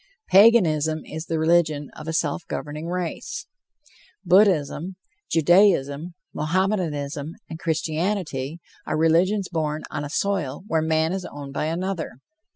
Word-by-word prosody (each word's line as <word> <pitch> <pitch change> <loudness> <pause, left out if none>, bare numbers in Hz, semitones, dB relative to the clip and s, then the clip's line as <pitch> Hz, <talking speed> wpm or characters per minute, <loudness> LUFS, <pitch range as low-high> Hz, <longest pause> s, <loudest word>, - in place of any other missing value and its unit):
Paganism 160 -8 +5
is 160 +1 -7
the 165 - -1
religion 160 -3 +2
of 155 - -9
a 160 - -2
self 160 0 0
governing 150 +2 -5
race. 180 -1 -4 0.8
Buddhism, 180 -2 +3 0.3
Judaism, 170 -2 +3 0.2
Mohammedanism, 155 -3 -1
and 160 - -8
Christianity 160 -2 -2 0.3
are 155 - 0
religions 180 +5 +3
born 155 -2 -2
on - - -3
a 145 - -5
soil 185 -5 -1
where 160 -6 +1
man 160 +1 +1
is 190 -1 -3
owned 140 -1 -8
by 150 - -1
another. 175 +1 -3
160 Hz, 125 wpm, -24 LUFS, 150-180 Hz, 0.8 s, Paganism